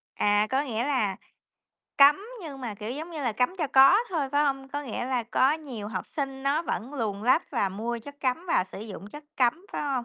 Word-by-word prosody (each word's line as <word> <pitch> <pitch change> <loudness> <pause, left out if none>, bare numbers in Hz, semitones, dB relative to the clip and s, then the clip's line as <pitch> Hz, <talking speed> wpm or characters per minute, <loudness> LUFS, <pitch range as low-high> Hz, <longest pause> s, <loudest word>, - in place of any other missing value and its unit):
À, 205 +1 +3
có 265 +2 +2
nghĩa 240 -4 -2
là 245 -9 0 0.8
cấm 280 +1 +8 0.3
nhưng 285 -5 -7
mà, 235 -5 -4
kiểu, 210 +2 -6
giống 310 +7 -6
như 315 -3 -5
là, 240 -4 0
cấm 250 - 0
cho 310 - +1
có 270 +6 +8
thôi, 305 -7 -1
phải 290 +1 +3
hông? 270 -1 -1
Có 290 +1 -4
nghĩa 245 -2 -4
là 255 -2 0
có 255 +4 +3
nhiều 265 -10 -6
học 185 -4 -4
sinh 270 -2 -4
nó 280 +4 +1
vẫn 265 -4 -4
luồn 210 -6 -2
lách 260 +8 +2
và 230 -7 +1
mua 225 +5 -3
chất 285 +5 -12
cấm 270 +7 -1
và 330 - +2
sử 190 - -10
dụng 210 -2 -8
chất 295 +8 -11
cấm, 270 +9 +1
phải - - -2
hông? 270 -4 -1
265 Hz, 235 wpm, -27 LUFS, 225-290 Hz, 0.8 s, cấm